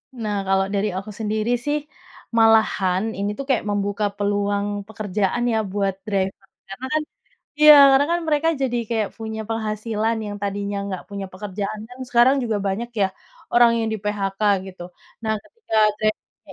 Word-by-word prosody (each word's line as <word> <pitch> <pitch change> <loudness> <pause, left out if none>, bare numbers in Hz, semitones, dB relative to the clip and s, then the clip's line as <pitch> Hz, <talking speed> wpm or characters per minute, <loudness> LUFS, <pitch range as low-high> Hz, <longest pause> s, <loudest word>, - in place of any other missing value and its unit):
Nah, 215 -4 -3
kalau 195 0 +3
dari 205 +1 0
aku 195 +3 -6
sendiri 215 +1 -1
sih 295 0 +1 0.6
malahan 220 -4 +4
ini 200 +1 -1
tuh 275 - -3
kayak 255 -4 +2
membuka 205 0 -1
peluang 205 0 0 0.2
pekerjaan 215 +1 -1
ya 225 - +1
buat 195 -1 0
driver. 195 -1 -2 0.2
Karena 195 +7 -7
kan 310 - +2 0.6
iya 300 0 +10 0.2
karena 270 +1 +4
kan 345 - +1
mereka 305 +1 +2
jadi 250 -2 0
kayak 220 -3 0
punya 220 -1 -5
penghasilan, 220 0 -1
yang 205 0 -5
tadinya 200 0 -2
nggak 190 -2 -5
punya 200 -1 -5
pekerjaan 200 +2 -5
kan 250 +1 -13
sekarang 245 +3 +5
juga 225 -3 -1
banyak 220 +5 -2
ya 195 - +5 0.5
orang 240 0 +7
yang 225 -1 0
di-PHK 205 -2 -3 0.3
gitu. 185 -2 -10 0.4
Nah 220 0 +1
ketika 455 - -6 0.2
driver-nya 215 0 -4
215 Hz, 155 wpm, -22 LUFS, 200-230 Hz, 0.6 s, iya